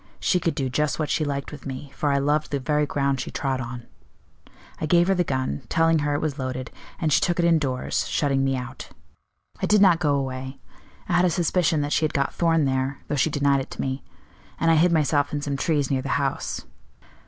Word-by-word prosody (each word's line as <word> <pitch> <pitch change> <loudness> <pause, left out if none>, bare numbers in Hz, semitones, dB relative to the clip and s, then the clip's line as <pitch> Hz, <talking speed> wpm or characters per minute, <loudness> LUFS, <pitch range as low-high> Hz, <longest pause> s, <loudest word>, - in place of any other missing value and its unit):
She 180 - +2
could 165 -1 -1
do 135 -4 -1
just 150 +3 0
what 155 -2 -2
she 155 - +1
liked 140 -2 -3
with 150 - -9
me, 135 +1 -7
for 145 - 0
I 140 - +2
loved 145 +2 +1
the 140 - -1
very 150 +2 0
ground 140 -1 0
she - - -5
trod 135 -3 -2
on. 120 0 -7 0.9
I 155 - -2
gave 175 +3 +4
her - - +5
the 180 -1 +2
gun, 130 - -2
telling 165 0 +3
her 145 0 0
it 145 - -1
was 150 -3 -2
loaded, 130 -1 -4 0.3
and 160 -5 +1
she - - +4
took 175 - +1
it 175 - +2
indoors, 145 -7 +1
shutting 135 -2 +1
me 135 0 +1
out. 125 -1 -7 0.7
I - - +1
did 210 - +4
not 185 -4 +5
go 145 -4 +2
away; 130 0 -4 0.5
I - - -1
had 175 +1 +4
a - - +4
suspicion 170 -2 +1
that 145 0 -1
she - - +1
had 155 - 0
got 140 -1 0
Thorn 165 -3 +2
there, 130 +1 -1
though 145 - 0
she 145 - +2
denied 140 -2 +2
it - - -8
to - - -6
me; 135 0 -3 0.6
and 165 0 +3
I - - +5
hid 170 +3 +4
myself 145 -3 +2
in 145 - -1
some 145 -1 -2
trees 145 -1 0
near 135 -1 +1
the 135 - -5
house. 140 -1 -2
145 Hz, 235 wpm, -24 LUFS, 135-160 Hz, 0.9 s, her